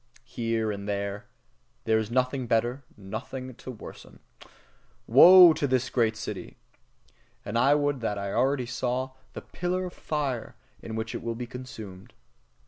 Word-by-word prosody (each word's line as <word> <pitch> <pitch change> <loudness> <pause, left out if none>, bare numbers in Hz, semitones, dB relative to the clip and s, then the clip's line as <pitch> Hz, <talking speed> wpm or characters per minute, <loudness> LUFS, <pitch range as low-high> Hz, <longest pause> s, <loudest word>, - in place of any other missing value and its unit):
Here 115 -2 -2
and 100 0 -6
there 100 0 -3 0.6
there 110 0 +2
is 110 -1 -3
nothing 130 +1 0
to - - -10
better, 120 +4 0
nothing 115 +6 -7
to 125 - -11
worsen. 120 -5 -11 0.9
Woe 180 -2 +9
to 145 - -1
this 130 0 0
great 110 -3 +1
city! - - -7 0.9
And 105 - -5
I 135 +5 +4
would 145 -3 0
that 105 -3 -2
I 100 0 -4
already 130 +1 +1
saw 130 +1 -2 0.2
the - - -8
pillar 180 +1 -3
of 180 - -7
fire 140 -6 -3 0.3
in 110 - -7
which 110 0 -4
it - - -5
will 115 0 -3
be 125 +1 -5
consumed! 110 -7 -10
120 Hz, 155 wpm, -27 LUFS, 110-130 Hz, 0.9 s, Woe